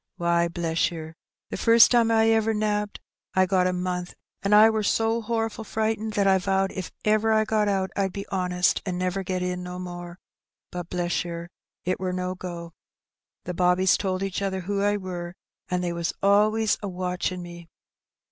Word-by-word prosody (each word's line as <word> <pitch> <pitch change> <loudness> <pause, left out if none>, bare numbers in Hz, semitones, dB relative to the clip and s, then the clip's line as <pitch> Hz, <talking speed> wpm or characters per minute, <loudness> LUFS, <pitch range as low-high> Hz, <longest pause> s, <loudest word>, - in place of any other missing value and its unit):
Why, 170 -1 +2
bless 170 +2 0
yer, 160 -2 -8 0.4
the - - -3
first 230 0 +6
time 235 -2 +4
I 225 0 +4
ever 225 0 +2
nabbed 210 -1 -1 0.4
I 185 0 +5
got 185 -1 +2
a - - +1
month, 180 0 -3 0.3
an' 195 - -1
I 210 +1 +8
wor 220 -1 0
so 225 +2 +1
horful 225 0 -2
frightened, 220 0 -2
that 205 -1 +1
I 190 -1 +4
vowed 195 +1 0
if 185 -2 -6
ever 215 +1 +3
I 220 0 +3
got 215 -1 +1
out 190 -2 0
I'd 195 -1 0
be 200 +2 -6
honest, 180 -1 +1
an' 185 -3 -3
never 185 +1 -1
get 185 -1 -2
in 180 0 -2
no 180 0 -6
more; 175 -1 -7 0.5
but, 175 -1 -6
bless 175 -1 -1
yer, 170 0 -6 0.4
it 185 - -1
wur 185 -1 -2
no 180 0 -2
go. 175 -2 -7 0.7
The 180 - -4
bobbies 180 +1 +3
told 190 -1 -2
each 195 0 -3
other 190 -1 -2
who 200 +2 -2
I 205 +1 +2
wur, 180 -2 -6 0.3
an' 180 -1 0
they 175 -1 -2
was 170 0 -2
always 215 +2 +3
a 205 - -4
watching 180 0 -3
me. 175 -1 -11
185 Hz, 190 wpm, -25 LUFS, 180-210 Hz, 0.7 s, I